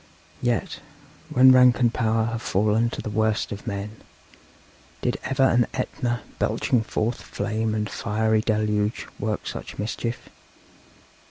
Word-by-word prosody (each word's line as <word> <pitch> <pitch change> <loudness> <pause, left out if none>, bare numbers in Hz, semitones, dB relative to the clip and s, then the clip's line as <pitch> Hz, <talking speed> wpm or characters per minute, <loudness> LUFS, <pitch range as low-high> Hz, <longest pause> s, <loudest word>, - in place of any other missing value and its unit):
Yet, 120 -2 -1 0.5
when 130 +1 +7
rank 125 -1 +6
and 120 -2 +3
power 110 -1 +1
have 115 0 -3
fallen 110 +3 +2
to - - -6
the - - -4
worst 110 0 0
of 105 +3 -7
men, 105 0 -4 1.1
did - - 0
ever 135 0 +1
an 120 -2 +4
Etna, 120 -2 -2 0.2
belching 125 - +1
forth 115 +1 -2
flame 110 +1 -2
and 105 -1 -1
fiery 110 +1 0
deluge, 105 -1 0
work 105 0 -2
such - - -6
mischief? 115 +3 -4
110 Hz, 135 wpm, -24 LUFS, 105-120 Hz, 1.1 s, when